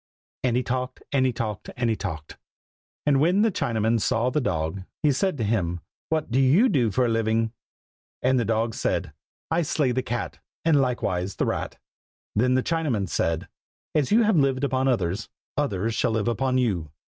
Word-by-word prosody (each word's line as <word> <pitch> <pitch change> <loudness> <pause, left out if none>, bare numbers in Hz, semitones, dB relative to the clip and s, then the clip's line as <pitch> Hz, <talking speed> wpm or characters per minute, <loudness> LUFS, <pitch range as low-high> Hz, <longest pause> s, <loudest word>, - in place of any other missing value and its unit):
And 125 -2 +2
he 125 - +1
talked, 130 0 -3
And 130 -2 +3
he - - +1
talked, 110 -4 -4
And 120 -1 +1
he 115 - +2
talked. 80 -8 -6 0.7
And 140 -2 +4
when 180 +8 +4
the 225 - +3
Chinaman 115 - 0
saw 120 +4 +1
the 150 - +1
dog, 80 -3 -1 0.2
he 150 - +5
said 180 +5 0
to 115 - -1
him, 90 -6 0 0.3
"what 155 -5 -1
do 125 - +3
you 155 - +5
do 125 - +2
for 125 +5 +2
a - - +2
living?" 115 0 +1 0.7
And 130 0 +3
the - - +2
dog 115 +1 0
said, - - -1 0.4
"I 165 +1 +3
slay 150 -4 +1
the 130 +1 0
cat, 120 -1 -4 0.3
and 155 -4 +5
likewise 100 -7 -1
the - - 0
rat." - - -3 0.6
Then 125 +4 +3
the 130 - +2
Chinaman 140 - 0
said, 80 -1 -1 0.5
"as 150 -4 +1
you 230 +2 +5
have 215 -4 +3
lived 135 -2 +2
upon 130 -1 +1
others, 100 -4 0 0.3
others 115 -6 0
shall - - +1
live 110 0 0
upon 130 +3 +1
you!" 95 -11 0
125 Hz, 190 wpm, -25 LUFS, 110-135 Hz, 0.7 s, he